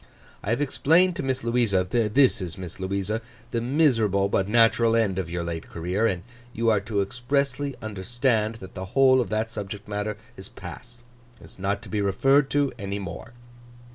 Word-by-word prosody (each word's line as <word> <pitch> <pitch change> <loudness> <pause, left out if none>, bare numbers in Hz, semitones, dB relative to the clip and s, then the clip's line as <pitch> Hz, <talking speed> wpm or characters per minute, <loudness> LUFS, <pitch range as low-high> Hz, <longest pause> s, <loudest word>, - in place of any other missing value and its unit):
I - - -5
have 120 +6 +1
explained 170 +6 +3
to - - -1
Miss 130 -2 -2
Louisa—this 115 +1 +2
is 90 +1 -5
Miss 90 -1 -8
Louisa—the 110 +5 -4
miserable 115 - +2
but 95 -1 +1
natural 115 +1 +4
end 100 -5 +1
of 90 -3 -3
your 85 0 -3
late 85 -1 -5
career; 90 +7 0
and 90 -4 -2 0.3
you 115 0 +2
are 105 - +3
to 100 0 -1
expressly 140 +5 -1
understand 110 +2 0
that 95 -4 -11
the 95 0 -5
whole 130 -1 +6
of 120 - -3
that 110 +1 -1
subject 105 -2 -6 0.5
is 95 +1 -9
past, 120 +6 -10 0.4
and - - -15
is - - -15
not 100 +2 -1
to - - -11
be 105 - -1
referred 135 +8 +3
to 145 -1 +1
any 100 -1 -3
more. 100 +4 -7
110 Hz, 170 wpm, -25 LUFS, 95-125 Hz, 0.5 s, whole